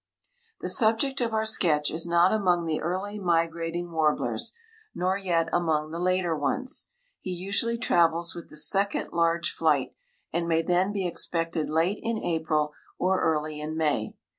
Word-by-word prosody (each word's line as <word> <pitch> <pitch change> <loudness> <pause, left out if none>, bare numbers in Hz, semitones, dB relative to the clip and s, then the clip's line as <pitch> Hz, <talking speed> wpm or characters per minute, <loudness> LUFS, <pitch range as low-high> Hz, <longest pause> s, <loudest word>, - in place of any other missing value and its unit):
The - - -3
subject 250 +3 +2
of 235 -1 0
our 220 0 0
sketch 160 -9 +2
is 165 +2 -2
not 170 +3 +4
among 180 -5 +2
the 160 -1 -1
early 195 +4 -3
migrating 170 -1 -1
warblers 155 -2 0 0.4
nor 185 +1 +1
yet 175 -4 0
among 155 -3 +1
the 165 - -4
later 180 -2 +1
ones. 255 - -1 0.3
He - - -7
usually 195 +6 -1
travels 170 -5 +2
with 170 - -9
the 155 - -8
second 200 +6 +2
large 170 0 +1
flight, 150 -5 +1 0.4
and 170 +1 -1
may 165 -1 +2
then 180 +4 +2
be 200 -2 -2
expected 165 -2 -1
late 165 +6 +1
in 230 0 -1
April 155 -5 0 0.2
or 185 +1 +1
early 155 -1 0
in 155 +1 -4
May. 150 -9 0
170 Hz, 160 wpm, -27 LUFS, 160-190 Hz, 0.4 s, not